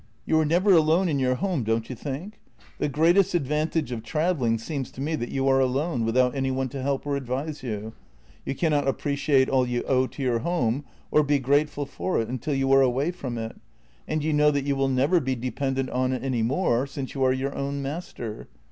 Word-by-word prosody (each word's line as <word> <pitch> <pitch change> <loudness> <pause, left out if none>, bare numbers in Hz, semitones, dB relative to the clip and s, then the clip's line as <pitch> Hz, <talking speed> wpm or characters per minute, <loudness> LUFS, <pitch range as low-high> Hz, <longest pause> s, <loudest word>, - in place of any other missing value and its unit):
You 160 - +3
are 155 - +2
never 175 +6 +3
alone 165 +3 +4
in 145 -3 0
your 130 -1 +2
home, 175 -3 -1
don't 115 +1 0
you 130 - -6
think? 150 - -6 0.4
The - - 0
greatest 175 +6 +3
advantage 150 -1 0
of 115 -2 -3
travelling 145 -3 0
seems 135 +2 -4
to - - -11
me 155 +4 -1
that 120 -5 -4
you 135 0 -1
are 135 0 +4
alone, 130 0 0
without 125 +2 +2
any 135 -1 -1
one 130 0 -1
to 135 +2 -6
help 140 +1 -1
or 145 -1 -1
advise 140 +3 -3
you. 110 -3 -5 0.5
You - - -3
cannot 150 -2 +1
ap 135 - +1
preciate 140 -2 +2
all 130 -2 +2
you 120 0 -1
owe 130 -1 +2
to 140 - -7
your 120 -3 +1
home, 140 -3 0 0.3
or 150 - +5
be 145 -1 +2
grateful 145 +2 +1
for 185 +6 -2
it, 115 - -2
until 130 +4 -2
you 135 0 +1
are 135 0 +7
away 135 +5 +2
from 130 -9 -5
it, 115 0 -5 0.5
and 155 -1 -1
you 155 0 0
know 150 0 +5
that 140 -2 0
you 140 -1 +1
will 135 0 +1
never 135 +7 +3
be 130 -3 -1
dependent 130 +2 -2
on 130 0 0
it 130 - -3
any 130 -4 0
more, 130 +1 +1
since 135 -1 -6
you 135 - -1
are 130 - +4
your 135 +2 -2
own 140 0 -3
master. 135 -7 -6
135 Hz, 225 wpm, -25 LUFS, 130-150 Hz, 0.5 s, are